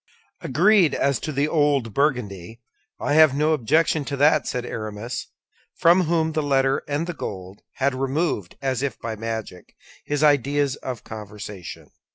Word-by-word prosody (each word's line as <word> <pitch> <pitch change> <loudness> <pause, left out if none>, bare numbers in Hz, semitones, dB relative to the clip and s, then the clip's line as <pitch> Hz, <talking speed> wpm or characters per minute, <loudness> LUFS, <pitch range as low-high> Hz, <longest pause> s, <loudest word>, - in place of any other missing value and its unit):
"Agreed, 175 - +3
as 140 -3 +1
to 155 - -4
the 140 +1 0
old 145 -8 +1
Burgundy; 115 - -1 0.4
I 145 - -1
have 155 -3 +6
no 155 +2 +2
objection 155 +3 +2
to 140 - -4
that," 150 +1 +3
said 125 -1 -3
Aramis, 110 +2 -5 0.5
from 175 +2 +4
whom 160 -1 +1
the 155 0 -1
letter 135 -2 +1
and 145 +3 -1
the 175 - -4
gold 95 - -7
had 140 0 0
removed, 135 - -2
as 130 -1 -1 0.2
by 115 -1 -4
magic, 110 -4 -6 0.3
his 145 0 -1
ideas 145 -1 +2
of 125 -4 -6
conversion. 105 -4 -9
135 Hz, 150 wpm, -23 LUFS, 115-150 Hz, 0.5 s, have